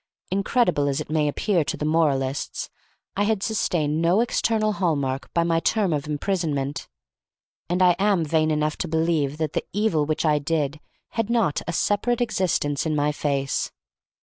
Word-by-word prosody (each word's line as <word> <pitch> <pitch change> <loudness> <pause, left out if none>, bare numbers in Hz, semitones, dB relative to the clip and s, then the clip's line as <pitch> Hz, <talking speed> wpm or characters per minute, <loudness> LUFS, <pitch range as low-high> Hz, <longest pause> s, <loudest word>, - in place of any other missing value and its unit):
Incredible 190 - +2
as 140 -1 0
it - - -6
may 155 -1 +2
appear 170 +3 +1
to - - -3
the 150 - -3
moralists, 145 -4 0 0.4
I 200 - 0
had 210 -2 0
sustained 160 -8 0
no 175 +6 +3
external 225 -2 +1
hallmark 140 -9 -1
by 170 - +2
my 165 -1 +2
term 200 -1 +1
of 145 -1 -2
imprisonment, 150 -3 -2 0.8
and 180 +1 +2
I 180 -1 +5
am 195 -4 +2
vain 155 +1 +2
enough 150 0 0
to - - -1
believe 160 -3 0
that 155 -2 -2
the - - -1
evil 180 -8 +1
which 155 +1 -1
I 150 -1 +3
did 150 -1 -1 0.3
had 225 -1 -2
not 225 -11 +1
a - - -1
separate 205 +7 +1
existence 180 - 0
in 155 - 0
my 145 0 +1
face. 140 -2 -1
160 Hz, 170 wpm, -24 LUFS, 145-195 Hz, 0.8 s, I